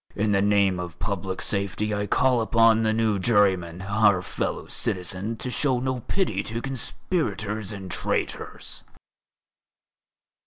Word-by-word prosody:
In 105 Hz, 0 st, +1 dB
the 100 Hz, -1 st, +3 dB
name 100 Hz, -2 st, +3 dB
of 90 Hz, -2 st, -6 dB
public 95 Hz, -1 st, -3 dB
safety 100 Hz, +1 st, -1 dB
I 105 Hz, 0 st, -1 dB
call 125 Hz, +3 st, +3 dB
upon 115 Hz, 0 st, +4 dB
the 110 Hz, -1 st, +2 dB
new 110 Hz, -2 st, +1 dB
juryman, 95 Hz, -5 st, +2 dB
our 100 Hz, -2 st, +3 dB
fellow -, -, -3 dB
citizen, 95 Hz, +5 st, -1 dB
to 125 Hz, -, -4 dB
show 130 Hz, -2 st, +2 dB
no 130 Hz, 0 st, -1 dB
pity 120 Hz, -, -1 dB
to 115 Hz, +3 st, -4 dB
conspirators 110 Hz, -, -3 dB
and 95 Hz, -3 st, -7 dB
traitors." -, -, -3 dB
105 Hz, 130 wpm, -25 LUFS, 95-115 Hz, -, upon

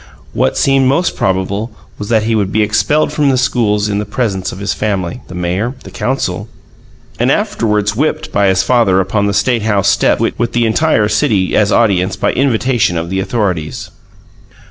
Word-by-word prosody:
What -, -, 0 dB
seemed 135 Hz, -1 st, +3 dB
most 155 Hz, +7 st, +1 dB
probable 95 Hz, +4 st, -1 dB, 0.3 s
was 105 Hz, -, -6 dB
that 110 Hz, -2 st, +2 dB
he 115 Hz, +1 st, 0 dB
would 100 Hz, -3 st, 0 dB
be 110 Hz, +1 st, +2 dB
expelled 145 Hz, +9 st, +1 dB
from 150 Hz, -2 st, +2 dB
the 130 Hz, -, +2 dB
schools 110 Hz, -5 st, +1 dB
in 100 Hz, -1 st, -1 dB
the -, -, -2 dB
presence 100 Hz, -8 st, -2 dB
of -, -, -9 dB
his 100 Hz, +1 st, -2 dB
family, 100 Hz, 0 st, -3 dB
the 95 Hz, -, -9 dB
mayor, 90 Hz, +8 st, -2 dB
and -, -, -12 dB
council, 110 Hz, -5 st, -2 dB, 0.7 s
and -, -, +2 dB
afterward 105 Hz, -2 st, 0 dB
whipped 150 Hz, +8 st, -2 dB
by 100 Hz, -1 st, +2 dB
his 95 Hz, -1 st, +2 dB
father 115 Hz, -7 st, +3 dB
upon 100 Hz, +2 st, 0 dB
the -, -, 0 dB
State 120 Hz, +3 st, +1 dB
House 105 Hz, -3 st, +1 dB
steps, -, -, +2 dB
with 120 Hz, 0 st, -1 dB
the 120 Hz, -1 st, +2 dB
entire 110 Hz, -2 st, +2 dB
city 105 Hz, -3 st, +1 dB
as 105 Hz, -1 st, +2 dB
audience 95 Hz, -5 st, +2 dB
by 95 Hz, -, -1 dB
invitation 125 Hz, -7 st, +1 dB
of 85 Hz, +2 st, -4 dB
the 95 Hz, -, -1 dB
authorities. 95 Hz, -7 st, -2 dB
105 Hz, 185 wpm, -14 LUFS, 95-120 Hz, 0.7 s, seemed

